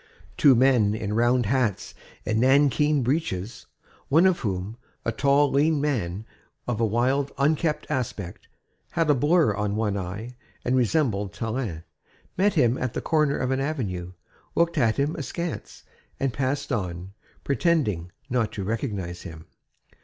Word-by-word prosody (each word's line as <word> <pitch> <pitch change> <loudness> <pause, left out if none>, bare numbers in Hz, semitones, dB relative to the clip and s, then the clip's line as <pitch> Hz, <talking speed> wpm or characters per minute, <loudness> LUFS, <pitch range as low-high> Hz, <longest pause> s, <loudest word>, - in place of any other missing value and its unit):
Two 140 -3 +6
men 120 -5 +4
in 105 -1 -3
round 120 +2 +2
hats 115 -3 0 0.3
and 110 +1 0
nankeen 140 +2 +3
breeches, 120 - -2 0.4
one 160 +6 +5
of 185 -2 +3
whom, 100 0 -3 0.3
a 115 - +1
tall, 140 +4 +3
lean 150 +2 +3
man 110 -9 -2 0.4
of 120 -2 -1
a - - +4
wild, 130 +6 +1
unkempt 150 +2 +1
aspect, 105 -8 -4 0.5
had 165 -3 +2
a - - +6
blur 145 -1 +3
on 105 0 -2
one 105 -2 0
eye 100 +6 -5 0.3
and 125 - +2
resembled 120 - +1
Tallien, 110 -8 -3 0.5
met 200 +2 +2
him 125 -5 +3
at 125 -2 -2
the - - -1
corner 150 -3 +1
of 130 0 -1
an 130 - 0
avenue, 100 - -3 0.4
looked 170 -1 +2
at 115 -4 +2
him 145 +3 0
askance 165 +3 -5 0.4
and 135 -3 0
passed 140 +2 -2
on, 90 -4 -3 0.3
pretending 135 - 0 0.2
not 120 -5 0
to 100 - -4
recognize 100 -5 -3
him. 80 -3 -10
125 Hz, 145 wpm, -25 LUFS, 105-145 Hz, 0.5 s, Two